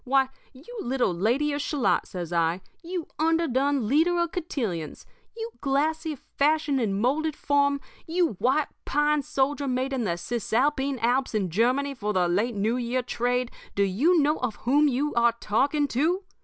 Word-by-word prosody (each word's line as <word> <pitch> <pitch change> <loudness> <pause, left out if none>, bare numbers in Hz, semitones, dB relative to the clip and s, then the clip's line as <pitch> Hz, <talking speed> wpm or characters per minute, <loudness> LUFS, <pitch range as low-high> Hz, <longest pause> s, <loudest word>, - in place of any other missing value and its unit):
Why, 265 0 +2 0.2
you 330 - -11
little 250 -6 0
Lady 245 +12 +1
of 290 - -2
Shalott,' 285 -3 0
says 175 -3 -6
I, 170 +2 +1 0.2
'you 350 -1 -4
underdone 285 -6 +1
leader 325 +8 +3
of 340 -1 0
cotillions, 225 - -4 0.3
you 455 +1 -5
glassy 310 +3 0
fashion 290 +1 0
and 200 -5 0
moulded 295 +6 0
form, 285 -1 +1 0.3
you 340 0 +2
white 265 +7 +2
pine 295 +1 +1
soldier 280 +1 -1
made 260 +1 -1
in 255 -3 -1
the 170 -3 -1
Cisalpine 260 - 0
Alps 250 0 +1
in 190 -5 0
Germany 255 - +1
for 210 -5 -3
the 180 -2 +2
late 210 +7 0
New 215 +4 0
Year 250 +1 -1
trade, 245 +1 -1 0.2
do 200 - +3
you 275 - +3
know 300 +1 +2
of 245 -4 -2
whom 290 +4 +4
you 285 +2 0
are 235 0 +3
talking 285 +8 +1
to? 330 +11 +1
270 Hz, 165 wpm, -26 LUFS, 235-295 Hz, 0.3 s, whom